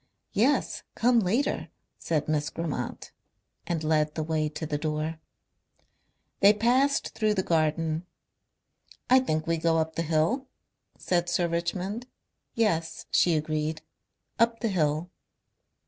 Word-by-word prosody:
"Yes, 250 +8 +2
come 240 +1 +4
later," 225 +8 0 0.3
said 155 -3 -1
Miss 150 -1 0
Grammont 155 -7 -4 0.6
and 165 -2 -1
led 155 -1 +1
the 155 - -1
way 155 -1 0
to 155 +1 -5
the 150 -1 -2
door. 155 +1 -2 1.2
They 200 +1 +7
passed 255 +6 +2
through 215 -1 0
the 190 - 0
garden. 160 +1 0 1.0
"I 260 - +8
think 155 -11 -1
we 165 0 +1
go 165 0 +2
up 160 0 0
the - - 0
hill? 165 - +1 0.2
" - - -54
said 175 -1 0
Sir 175 0 +1
Richmond. 180 +7 -3 0.5
"Yes," 165 -8 0
she 170 -2 +4
agreed, 155 0 -2 0.6
"up 230 0 +2
the 230 - +1
hill." 160 -1 0
165 Hz, 130 wpm, -27 LUFS, 155-210 Hz, 1.2 s, I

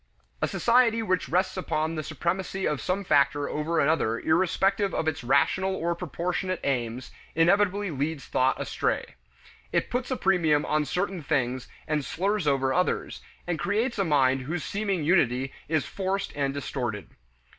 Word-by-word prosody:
A - - +2
society 235 -1 +3
which 185 -4 0
rests 185 +2 +1
upon 160 -3 -1
the 155 - -2
supremacy 185 +4 -2
of 150 -2 0
some 190 +2 -1
factor 145 -3 +2
over 155 +3 -1
another 140 -7 +2
irrespective 190 +4 +1
of 160 - -1
its 150 -5 -1
rational 190 +9 +2
or 170 -1 -1
proportionate 180 +2 -3
claims, 125 -2 -2 0.2
inevitably 200 +3 +3
leads 145 +1 -3
thought 130 +1 +1
astray. - - -2 0.6
It - - 0
puts 250 +1 -1
a 260 - -1
premium 165 -6 +2
on 150 0 +1
certain 180 +2 -2
things 130 -4 -1 0.2
and 150 -1 0
slurs 195 +4 -1
over 135 -1 +2
others, 180 +4 -1 0.2
and 175 -2 -2
creates 225 +3 0
a - - +3
mind 135 -5 +3
whose 155 +6 -3
seeming 200 -5 -1
unity 135 -6 +2 0.2
is 155 -3 +1
forced 195 0 -2
and 140 -1 0
distorted. 120 - -4
165 Hz, 155 wpm, -27 LUFS, 140-190 Hz, 0.6 s, society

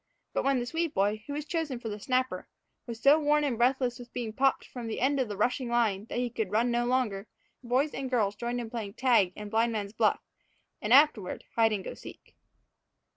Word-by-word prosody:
But - - 0
when 275 -1 +2
the 240 - -1
Swede 325 +4 -2
boy, 205 +2 +1
who 285 - -4
was 295 0 -4
chosen 315 -6 -2
for 235 - -7
the 210 -1 -5
snapper, 255 +4 -1 0.4
was 230 -1 -6
so 280 +6 +6
worn 300 0 +2
and 275 -5 0
breathless 250 +1 +1
with 245 0 -11
being 230 -3 -4
popped 270 +3 +1
from 245 -3 -7
the 225 - -3
end 275 +3 +2
of 255 - +1
the 205 -2 -6
rushing 245 +3 0
line 220 -4 +1
that 230 - -5
he 245 -1 -1
could 220 -4 -2
run 230 +4 +1
no 240 0 +1
longer, 225 -5 0 0.4
boys 255 +5 +1
and 270 -1 -4
girls 215 -6 +1
had 205 - -28
joined 240 +1 -2
in 225 -2 -7
playing 215 -4 -5
tag 235 -8 +3
and 210 -1 -8
blindman's 220 -3 0
buff - - +2 0.6
and, 210 - -3
afterward, 255 -8 +4
hide 225 -1 +4
and 200 -3 -2
go - - -6
seek. - - -13
240 Hz, 225 wpm, -29 LUFS, 215-260 Hz, 0.6 s, so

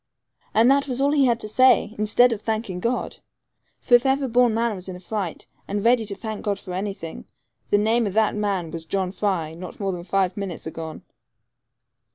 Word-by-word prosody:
And 230 +4 +6
that 280 +1 +2
was 255 -1 -2
all 280 +1 +3
he 285 -2 +4
had 235 -1 +1
to - - -4
say, 255 0 +4
instead 230 +3 +5
of 215 - -6
thanking 215 -5 -3
God! 235 +6 -2 0.6
For 245 - -2
if 240 0 +7
ever 270 0 +1
born 245 -1 +3
man 230 -1 0
was 185 0 -8
in 185 - -6
a - - -9
fright, 190 -2 -4 0.2
and 205 +1 -3
ready 235 -1 +4
to 200 -1 -2
thank 215 +1 -6
God 205 -2 -1
for 185 -2 -8
anything, 190 -3 -5 0.4
the 205 - +4
name 220 +2 +2
of 195 - -4
that 220 -1 +3
man 195 -6 -1
was 165 -1 -7
John 190 0 -1
Fry 185 -5 -1
not 175 +2 -9
more 195 -2 -1
than 175 -2 -6
five 185 0 0
minutes 195 -5 -5
agone. 160 0 -7
210 Hz, 205 wpm, -23 LUFS, 185-235 Hz, 0.6 s, if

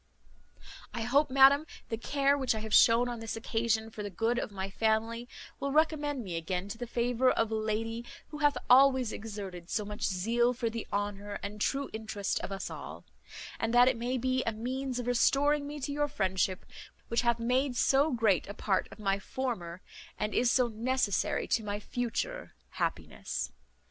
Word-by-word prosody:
"I 235 - -2
hope, 275 +5 +3
madam, 275 +3 +6 0.2
the 225 - -1
care 280 +3 +2
which 260 -5 0
I - - -2
have 220 -1 -5
shewn 230 +3 +6
on 240 -1 -4
this 225 0 -4
occasion 225 0 -1
for 215 - -7
the 205 - -4
good 225 +5 0
of - - -3
my 195 -2 -4
family 225 +3 0 0.3
will 275 0 -2
recommend 295 -3 +1
me 180 -5 -4
again 180 +3 -3
to 215 - -6
the 245 - -4
favour 245 +2 +2
of 225 -3 +1
a - - 0
lady 225 +2 -2 0.3
who 300 - -8
hath 290 -3 +3
always 260 -2 +6
exerted 195 -5 -7
so 210 - -1
much 210 0 -7
zeal 230 +6 +1
for 235 -2 -2
the 230 0 -5
honour 205 0 -3
and 210 +1 -6
true 275 +4 0
interest 220 -2 -2
of - - -6
us 195 - -4
all; - - -8 0.5
and 230 +1 0
that 245 +1 +7
it 260 - +3
may 245 +3 -2
be 255 +1 0
a 230 - 0
means 255 +3 -3
of 245 - -3
restoring 285 +4 +2
me 295 +1 -6
to 280 +1 -3
your 295 0 +1
friendship, 190 -8 -1 0.4
which 230 - +2
hath 235 -1 +2
made 250 +3 0
so 275 +5 +3
great 225 -7 +2
a 200 - -7
part 195 -3 0
of - - -11
my 200 -2 0
former, 190 -7 -4 0.3
and 210 0 -2
is 245 - +3
so 250 -2 +3
necessary 235 -2 0
to 225 - +1
my 205 0 -3
future 245 - -3 0.2
happiness. - - -3
230 Hz, 190 wpm, -30 LUFS, 210-260 Hz, 0.5 s, that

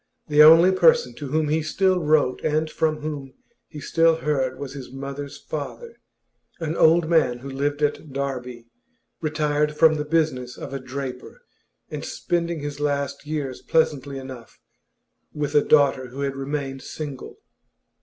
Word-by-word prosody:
The 150 0 +5
only 165 +4 +8
person 475 - +4
to 145 - -6
whom 155 +2 0
he 155 +1 +1
still 185 +4 +1
wrote 150 -4 +2
and 155 0 0
from 155 -1 0
whom 145 -3 -6 0.3
he 150 - -10
still 165 +2 +3
heard 135 -5 -1
was 135 -1 -7
his 135 -3 -9
mother's 140 +1 -7
father 470 -1 -7 0.6
an 165 -1 -3
old 165 0 +4
man 155 -7 +2
who 135 +3 -9
lived 145 +2 -2
at 145 0 -1
Derby, 125 -3 -4 0.6
retired 150 -1 0
from 155 -1 +5
the 150 - -2
business 150 -6 -1
of - - -8
a 135 - -3
draper, 130 - -7 0.5
and - - -5
spending 170 -2 -2
his 145 0 -5
last 145 0 -2
years 145 -4 -4
pleasantly 140 -4 0
enough 130 -3 -10 0.8
with 145 -1 -2
a 145 - +5
daughter 140 -4 +3
who 130 +3 -8
had 140 -1 -2
remained 135 -1 -4
single. 145 -4 -7
145 Hz, 155 wpm, -23 LUFS, 135-155 Hz, 0.8 s, only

